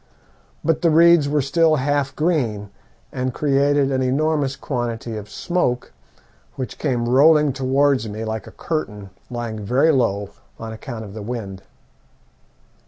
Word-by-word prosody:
But 160 -1 +1
the 170 - +4
reeds 165 -2 +5
were 145 -1 +1
still 155 +3 +3
half 140 -1 -1
green, 120 - -1 0.4
and 130 -1 -3
created 140 -1 +2
an 130 -1 0
enormous 140 +1 0
quantity 120 -4 -4
of 105 -1 -7
smoke, 150 - -2 0.6
which 130 - -6
came 120 -2 -1
rolling 150 +3 +5
towards 135 -2 +1
me 110 +2 -5
like 110 -1 -4
a - - -10
curtain, 105 - -4 0.2
lying 120 -3 -4
very 130 +10 +3
low 100 -7 0 0.3
on 115 0 -7
account 110 -1 -7
of 100 - -10
the 110 - -7
wind. 100 -4 -6
130 Hz, 140 wpm, -21 LUFS, 110-145 Hz, 0.6 s, reeds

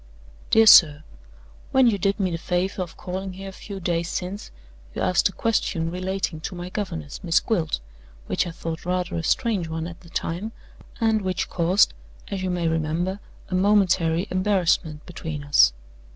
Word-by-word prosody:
"DEAR 225 0 +6
SIR 155 -7 +8 0.7
When 265 -1 +5
you 215 -4 +3
did 195 +3 0
me 190 -2 0
the 165 - -3
favor 185 +3 -1
of 175 -2 -6
calling 185 +1 -5
here 195 +1 -8
a - - -9
few 195 +1 -8
days 170 -1 -1
since, 190 +3 -4 0.5
you - - -3
asked 180 - +3
a - - -9
question 180 -7 -1
relating 185 -2 -3
to 180 +4 -6
my 175 +1 -6
governess, 170 - -5
Miss 165 -2 +3
Gwilt, 170 -9 -1 0.4
which - - 0
I - - -3
thought 165 0 -6
rather 180 0 -2
a 165 - -2
strange 215 -5 0
one 160 0 -4
at 170 0 -8
the 170 - -16
time, 180 +8 -3 0.5
and 220 -2 +2
which 185 -1 -2
caused, 180 - +3 0.4
as 195 -2 -3
you 185 - -2
may 175 -2 0
remember, 165 +4 -1 0.3
a - - -5
momentary 185 -3 +3
embarrassment 185 -5 +1
between 160 -4 -6
us. 145 0 +5
180 Hz, 175 wpm, -24 LUFS, 165-195 Hz, 0.7 s, SIR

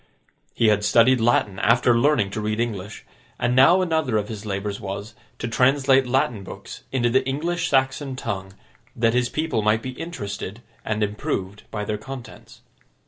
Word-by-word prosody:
He 115 - +4
had 105 -1 +2
studied 115 +4 +4
Latin 105 -4 +2
after 120 +2 +4
learning 120 -5 +2
to 110 - -3
read 105 +1 -2
English, 105 -3 -4 0.3
and 120 +1 0
now 170 +9 +6
another 160 -9 0
of 105 -1 -2
his 110 -1 -7
labours 100 0 -3
was, 100 +2 -6 0.2
to - - -4
translate 135 +2 +3
Latin 125 -5 0
books - - -9
into 120 -3 +1
the 130 - +3
English 165 +5 -1
Saxon 130 0 +1
tongue, 95 -6 -5 0.4
that 115 0 +2
his 125 0 +1
people 155 -8 -1
might 105 +2 +2
be 130 - -4
interested, 110 - -6 0.2
and 110 0 -1
improved 100 -1 -3
by 105 -1 -4
their 105 0 -3
contents. 130 +1 -10
115 Hz, 165 wpm, -23 LUFS, 105-130 Hz, 0.4 s, now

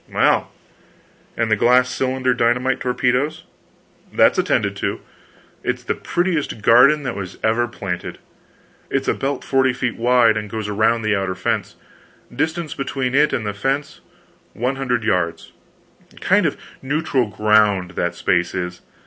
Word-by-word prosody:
"Well, - - +2 0.9
and 115 -1 0
the - - +5
glass 125 +4 +4
cylinder 130 0 0
dynamite 125 +2 +1
torpedoes?" 125 +4 0 0.7
"That's - - +4
attended - - 0
to. - - -2 0.6
It's - - -2
the - - -1
prettiest 170 - -2
garden 140 +7 +6
that 125 -3 -3
was 95 -3 -7
ever 115 +2 +2
planted. 95 -6 -5 0.7
It's - - -1
a - - +3
belt 135 0 -3
forty 130 -1 +2
feet 125 -2 -3
wide, 120 -2 +4
and 105 -1 -4
goes 110 0 -4
around 110 +2 +1
the 110 -1 +1
outer 95 -1 -2
fence 90 - -2 0.6
distance 160 +3 -2
between 135 -2 -3
it 150 +2 +4
and 110 - -2
the 105 - -2
fence 135 +8 -3 0.5
one 125 +4 -2
hundred 125 -4 -1
yards 90 -6 -1 0.7
kind - - +3
of - - -3 0.2
neutral 135 -3 0
ground 105 -3 +2
that 85 -1 -2
space 90 0 0
is. 90 -1 -4
120 Hz, 145 wpm, -20 LUFS, 105-135 Hz, 0.9 s, garden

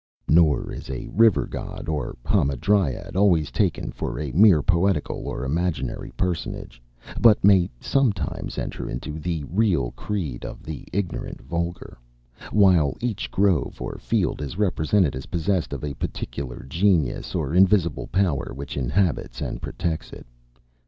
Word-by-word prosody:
Nor 80 -2 +4
is - - -8
a 65 - -5
river 110 +1 +4
god - - -7
or 75 -6 -3
hamadryad 70 +3 +1
always 85 -8 +3
taken - - 0
for - - -4
a 75 -3 -3
mere 90 - +6
poetical 90 -2 +1
or - - -3
imaginary 75 -3 -2
personage, 85 -8 -3 0.4
but 115 -3 +6
may 95 -3 +5
sometimes 105 - -1
enter - - -4
into 75 +5 -5
the 80 -1 -2
real 85 - +1
creed 85 -13 -4
of - - -8
the 75 -1 -7
ignorant 95 -3 -3
vulgar; 85 -5 -4 0.5
while 90 -9 +4
each 115 -4 -2
grove 95 -5 +1
or - - -5
field - - 0
is 75 +4 -5
represented 90 -5 +2
as 65 - -7
possessed 90 +1 -1
of 70 -1 -5
a 75 -1 -3
particular 70 -1 -5
genius 85 -2 +1
or 70 - -1
invisible 90 -3 +3
power 90 -12 0
which 70 0 -6
inhabits 80 +6 0
and - - -4
protects, 85 -3 -3
it. - - -10
85 Hz, 140 wpm, -24 LUFS, 70-95 Hz, 0.5 s, mere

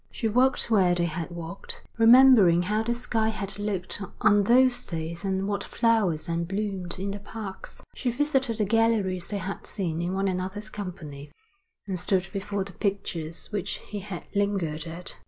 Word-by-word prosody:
She 230 - -2
walked 250 +2 +2
where 185 -5 +4
they 175 -1 +1
had 165 0 -4
walked, 170 +1 -7 0.2
remembering 225 -7 +7
how 210 +4 0
the 235 +2 -1
sky 225 -2 0
had 205 -2 -5
looked 205 -2 -3 0.2
on 205 0 +5
those 250 +2 +4
days 165 +1 -5
and 190 0 -1
what 200 -1 -1
flowers 215 -9 +1
then 170 0 -1
bloomed 195 -1 -3
in 195 +2 -3
the 205 - -5
parks; 205 -1 -8
she 255 - -2
visited 265 -2 +1
the 215 - +1
galleries 210 -5 +1
they 205 - -2
had 195 +1 -5
seen 170 -5 -2
in 175 +2 -2
one 195 +1 0
another's 190 +3 -3
company, 150 -8 -7 0.5
and 190 -3 -3
stood 185 +1 0
before 200 0 -2
the 195 - -9
pictures 170 -5 -3
which 205 -3 -2 0.2
he 205 - -4
had 190 -3 -7
lingered 190 -6 0
at. 170 +2 -6
195 Hz, 175 wpm, -27 LUFS, 175-215 Hz, 0.5 s, remembering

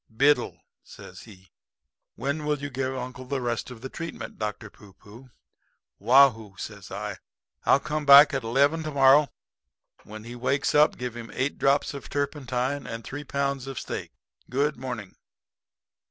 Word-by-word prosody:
"'Biddle,' 140 +6 +1 0.2
says - - -12
he, 95 -3 -17 0.6
'When 140 +5 -3
will 150 0 0
you 145 0 -6
give 130 +1 -2
uncle 130 0 -7
the 135 +1 -2
rest 120 -1 -3
of 120 -3 -11
the 130 - -6
treatment, 165 +3 -7
Dr. 105 0 -5
Pooh 100 -2 -17
pooh?' 110 +7 -16 0.7
"'Waugh 130 +6 +7
hoo,' 110 -4 -13
says - - -8
I. - - -5 0.5
'I'll 140 - +5
come 155 0 -3
back 140 +1 +9
at 135 - 0
eleven 140 +8 +2
to 155 - -4
morrow. 140 +1 +5 0.8
When 110 +1 -10
he 120 +2 -9
wakes 130 +3 0
up 150 +1 +4
give 125 -1 -5
him 115 -1 -8
eight 135 +3 -2
drops 140 +2 +2
of 140 - -9
turpentine 140 -1 -2
and 115 0 -6
three 145 +5 -7
pounds 140 -1 -2
of 135 -2 -6
steak. - - -6 0.4
Good 145 +4 0
morning.' 120 -6 -7
130 Hz, 165 wpm, -26 LUFS, 120-140 Hz, 0.8 s, back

